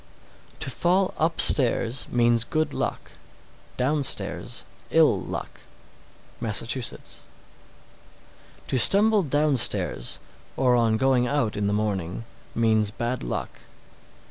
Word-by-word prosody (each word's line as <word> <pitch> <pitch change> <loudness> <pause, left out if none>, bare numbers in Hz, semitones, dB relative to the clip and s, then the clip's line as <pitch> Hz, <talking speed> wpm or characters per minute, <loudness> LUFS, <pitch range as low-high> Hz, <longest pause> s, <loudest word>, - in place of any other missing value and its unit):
671. - - -28
To 130 - -3
fall 185 +2 +1
upstairs 125 -6 +2
means 120 -1 +1
good 155 +3 -3
luck; - - -5 0.7
downstairs, 140 +2 0 0.2
ill - - +2
luck. - - -8 0.8
Massachusetts. 115 +3 -3 1.5
672. - - -3
To 120 - +9
stumble 210 +1 +5
downstairs, 145 - +2 0.4
or 125 -2 +2
on 115 -2 +1
going 130 -1 +1
out 120 -5 -2
in 105 -1 -2
the 100 - -1
morning, 100 -1 -4 0.3
means 110 -2 +1
bad 120 +3 -5
luck. - - -6
120 Hz, 105 wpm, -23 LUFS, 110-145 Hz, 1.5 s, To